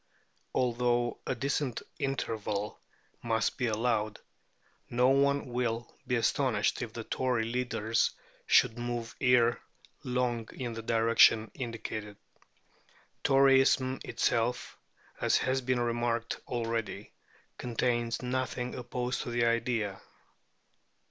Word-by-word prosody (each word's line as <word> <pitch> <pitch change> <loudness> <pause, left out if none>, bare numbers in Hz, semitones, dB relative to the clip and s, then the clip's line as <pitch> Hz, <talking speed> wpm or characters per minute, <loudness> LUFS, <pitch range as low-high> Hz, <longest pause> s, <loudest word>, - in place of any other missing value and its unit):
Although 120 -1 +1
a - - 0
decent 135 0 -1 0.2
interval 110 -6 -2 0.4
must 115 +1 0
be 125 - +1
allowed, 110 -1 0 0.7
no 125 +2 +3
one 140 +1 +3
will 120 -1 -2
be 125 - +1
astonished 115 - +1
if - - -4
the - - -6
Tory 125 -3 0
leaders 115 -2 0 0.4
should 115 +2 +4
move 120 -1 -4
ere 125 -2 +4 0.4
long 125 -2 -1
in 120 -3 -4
the 115 - -5
direction 115 -1 +4
indicated. 110 -4 -5 1.1
Toryism 135 -1 +4
itself, 120 +2 0 0.4
as - - +3
has 130 +1 0
been 130 0 0
remarked 120 -1 -1
already, 115 -4 -3 0.5
contains 120 0 -1
nothing 125 0 -2
opposed 125 0 -3
to - - -5
the 120 0 +1
idea. 115 -4 0
120 Hz, 105 wpm, -30 LUFS, 115-125 Hz, 1.1 s, should